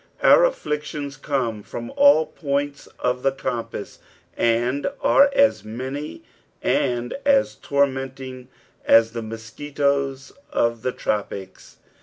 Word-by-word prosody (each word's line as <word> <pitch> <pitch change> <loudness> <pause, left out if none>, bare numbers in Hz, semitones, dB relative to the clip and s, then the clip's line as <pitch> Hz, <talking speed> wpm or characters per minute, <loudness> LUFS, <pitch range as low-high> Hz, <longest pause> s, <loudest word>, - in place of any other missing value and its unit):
Our - - +7
afflictions 150 - -3
come 130 -6 -2
from 120 +3 -7
all 285 - +6
points 140 -1 -3
of 125 0 -1
the 135 - +2
compass, 130 -3 -5 0.4
and 120 +4 +1
arc 280 0 +5
as 275 0 +3
many 130 - -6 0.4
and 120 -1 0
as 275 -1 +3
tormenting 135 -2 -2 0.4
as 115 0 +5
the 115 0 -4
mosquitoes 135 +4 -2 0.2
of 115 -1 0
the 125 - -1
tropics. 100 -4 -4
135 Hz, 110 wpm, -23 LUFS, 120-145 Hz, 0.4 s, Our